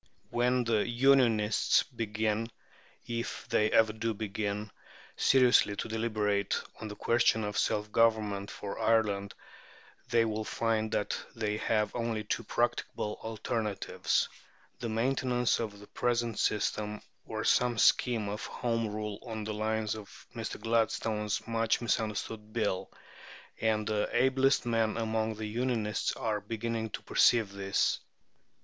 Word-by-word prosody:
When 125 Hz, +1 st, +2 dB
the 115 Hz, -3 st, +1 dB
"Unionists" 120 Hz, -4 st, +4 dB
begin, 110 Hz, 0 st, -2 dB, 0.6 s
if 115 Hz, 0 st, -4 dB
they 105 Hz, 0 st, +3 dB
ever 110 Hz, -1 st, +4 dB
do 115 Hz, 0 st, -2 dB
begin, 105 Hz, 0 st, -3 dB, 0.4 s
seriously 125 Hz, -5 st, +4 dB
to -, -, -3 dB
deliberate 110 Hz, -3 st, 0 dB, 0.2 s
on 110 Hz, -, -5 dB
the 105 Hz, -, -7 dB
question 115 Hz, -1 st, +2 dB
of 105 Hz, 0 st, -3 dB
self 105 Hz, 0 st, 0 dB
government 105 Hz, -3 st, +2 dB
for 100 Hz, -1 st, -6 dB
Ireland, 105 Hz, -3 st, +1 dB, 0.7 s
they 115 Hz, -1 st, +4 dB
will 110 Hz, 0 st, -2 dB
find 110 Hz, -1 st, -1 dB
that 105 Hz, -, 0 dB, 0.2 s
they 105 Hz, -2 st, -1 dB
have 110 Hz, -1 st, 0 dB
only 115 Hz, -2 st, -1 dB
two 105 Hz, -, -2 dB
practicable 105 Hz, 0 st, -1 dB
alternatives 110 Hz, -1 st, -1 dB, 0.5 s
the 115 Hz, -, -3 dB
maintenance 125 Hz, +1 st, +1 dB
of 105 Hz, -3 st, -4 dB
the 105 Hz, -, -12 dB
present 120 Hz, -1 st, -1 dB
system, 105 Hz, 0 st, -1 dB, 0.2 s
or -, -, -3 dB
some 125 Hz, -1 st, +3 dB
scheme 115 Hz, -1 st, +3 dB
of 105 Hz, +1 st, -4 dB
Home 115 Hz, -2 st, -1 dB
Rule 105 Hz, -1 st, -4 dB
on 110 Hz, -3 st, -5 dB
the 110 Hz, 0 st, -3 dB
lines 110 Hz, 0 st, -1 dB
of 110 Hz, -2 st, -10 dB
Mr. 115 Hz, -2 st, -5 dB
Gladstone's 110 Hz, -1 st, 0 dB
much 115 Hz, -1 st, +1 dB
misunderstood 110 Hz, -1 st, -2 dB
Bill. 105 Hz, -5 st, -1 dB, 0.7 s
And 110 Hz, -1 st, +1 dB
the 105 Hz, -1 st, 0 dB
ablest 130 Hz, +1 st, +3 dB
men 115 Hz, -2 st, +1 dB
among 110 Hz, -1 st, -1 dB
the 110 Hz, 0 st, -5 dB
"Unionists" 110 Hz, -1 st, -1 dB
are 110 Hz, -2 st, -1 dB
beginning 115 Hz, +1 st, -3 dB
to -, -, -6 dB
perceive 115 Hz, -5 st, +4 dB
this. 100 Hz, 0 st, 0 dB
110 Hz, 130 wpm, -31 LUFS, 105-115 Hz, 0.7 s, Unionists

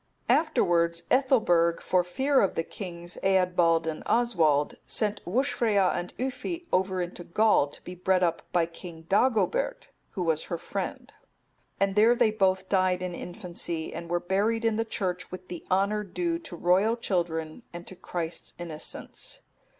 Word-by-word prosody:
(275) 320 Hz, -, +4 dB
Afterwards 170 Hz, -, +1 dB
Ethelberg, 220 Hz, -11 st, +3 dB
for 185 Hz, -1 st, +2 dB
fear 265 Hz, +10 st, +2 dB
of 195 Hz, -, +1 dB
the 165 Hz, -, 0 dB
kings 175 Hz, -2 st, -7 dB
Eadbald 180 Hz, -3 st, +3 dB
and 160 Hz, -1 st, -3 dB
Oswald,(276) 165 Hz, -12 st, +2 dB
sent 210 Hz, -1 st, -1 dB
Wuscfrea 215 Hz, -3 st, +2 dB
and 175 Hz, -, -5 dB
Yffi 335 Hz, +7 st, -3 dB
over 185 Hz, 0 st, +1 dB
into 175 Hz, 0 st, -7 dB
Gaul 210 Hz, -4 st, +3 dB
to 145 Hz, -, -13 dB
be 180 Hz, -, -7 dB
bred 185 Hz, +1 st, +1 dB
up 170 Hz, -1 st, +1 dB
by 175 Hz, -2 st, +3 dB
King 165 Hz, -1 st, -10 dB
Dagobert,(277) 265 Hz, -, +1 dB, 0.3 s
who 185 Hz, -, -2 dB
was 160 Hz, -2 st, 0 dB
her 170 Hz, -, -3 dB
friend; -, -, -5 dB, 0.7 s
and 195 Hz, 0 st, +2 dB
there 225 Hz, +3 st, +6 dB
they 220 Hz, -, +3 dB
both 190 Hz, -3 st, +1 dB
died 185 Hz, -2 st, +2 dB
in 180 Hz, -1 st, -3 dB
infancy, 175 Hz, -3 st, -5 dB
and 170 Hz, -, -7 dB
were 175 Hz, 0 st, +1 dB
buried 210 Hz, +6 st, 0 dB
in 225 Hz, -1 st, +2 dB
the 225 Hz, -, 0 dB
church 185 Hz, -5 st, -3 dB
with 185 Hz, 0 st, -9 dB
the 175 Hz, -2 st, -6 dB
honour 200 Hz, +3 st, +2 dB
due 335 Hz, -, -2 dB
to 325 Hz, -, -8 dB
royal 185 Hz, +7 st, +3 dB
children 170 Hz, -4 st, -2 dB
and 175 Hz, 0 st, -8 dB
to 185 Hz, -, -10 dB
Christ's 170 Hz, -2 st, -4 dB
innocents. 165 Hz, -3 st, -6 dB
185 Hz, 160 wpm, -27 LUFS, 170-220 Hz, 0.7 s, there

